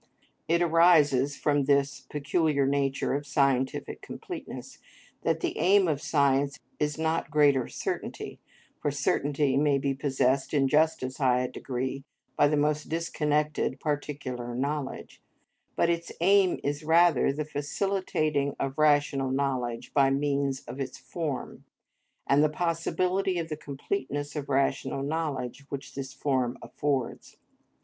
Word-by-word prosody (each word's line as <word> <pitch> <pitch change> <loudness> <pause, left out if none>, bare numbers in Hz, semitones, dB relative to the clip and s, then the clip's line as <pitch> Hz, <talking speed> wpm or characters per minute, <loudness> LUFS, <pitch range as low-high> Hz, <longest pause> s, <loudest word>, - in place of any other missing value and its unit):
It 170 +2 +3
arises 155 -5 +4
from 145 -2 +1
this 140 0 +1
peculiar 150 -1 +1
nature 140 -1 0
of 145 +1 -3
scientific 135 -2 0
completeness, - - -8 0.4
that - - 0
the - - -1
aim 195 0 +5
of 145 -3 0
science 140 -1 +2 0.2
is 150 0 -1
not 160 -2 -1
greater 145 -4 +3
certainty—for - - -6
certainty 140 0 +1
may 145 -1 +3
be 140 0 0
possessed 135 0 0
in 135 -2 +3
just 155 +1 +2
as 130 +1 -4
high 125 -2 +3
a 125 - -1
degree 130 +1 -4 0.3
by - - +5
the 150 +1 +1
most 150 +1 0
disconnected 150 -2 0
particular 135 -5 -3
knowledge—but 140 +4 -4
its 170 0 -3
aim 190 +1 +4
is 145 +2 -2
rather 165 -3 +4
the 150 +2 -3
facilitating 150 -2 -1
of 135 +2 -3
rational 145 -3 +3
knowledge 130 -3 -2
by 135 -2 +4
means 140 -1 0
of 135 - -9
its 130 -2 -4
form, 145 +1 -5 0.6
and 140 +2 +4
the 155 - +4
possibility 180 +3 0
of 165 -1 -3
the 155 - -2
completeness 145 - -4
of 145 -2 -4
rational 135 0 0
knowledge 140 -4 -3
which 140 -1 -6
this 135 -1 -5
form 130 -2 -1
affords. 140 -4 -3
145 Hz, 130 wpm, -28 LUFS, 135-155 Hz, 0.6 s, aim